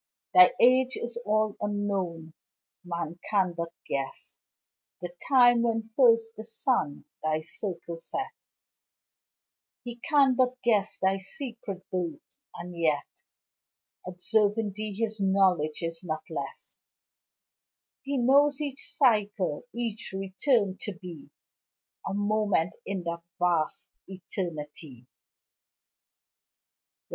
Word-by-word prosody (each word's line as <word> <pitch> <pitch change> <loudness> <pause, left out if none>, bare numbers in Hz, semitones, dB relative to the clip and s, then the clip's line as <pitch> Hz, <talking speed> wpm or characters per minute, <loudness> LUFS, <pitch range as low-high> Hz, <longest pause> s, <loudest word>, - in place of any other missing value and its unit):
Thy 365 -7 +9
age 255 +1 +5
is 235 0 -5
all 215 0 +2
unknown 195 -6 -2 0.5
man 170 -1 -4
can 190 -4 +2
but 170 0 -3 0.2
guess 135 -1 -4 0.6
The 180 -1 -5 0.2
time 245 -3 +6
when 225 -1 -1
first 230 -3 +4
the 220 - -7
Sun 225 - -1 0.2
thy 155 0 0
circle 170 -2 -5
set 165 - -4 1.5
He 240 -1 -7
can 280 -1 +4
but 255 0 +2
guess 210 -4 +2
thy 190 0 +1
secret 230 -3 -7
birth 180 -3 -4 0.2
and 175 +1 -7
yet 155 -4 +1 1.0
Observing 205 +3 +1
thee 215 0 -4
his 220 0 -2
knowledge 185 -5 +2
is 165 +1 -1
not 155 -3 -3
less; - - -4 1.2
He 280 0 -2
knows 275 +3 +4
each 280 -2 -4
cycle, 210 - +2
each 230 -4 -4
return 195 +1 +1
to 210 - -3
be 175 -4 -10 0.8
A 195 - -2
moment 205 -4 +1
in 195 -2 -2
that 170 0 -3 0.2
vast 175 -3 +1 0.2
eternity. 155 -8 -6
200 Hz, 105 wpm, -28 LUFS, 170-235 Hz, 1.5 s, Thy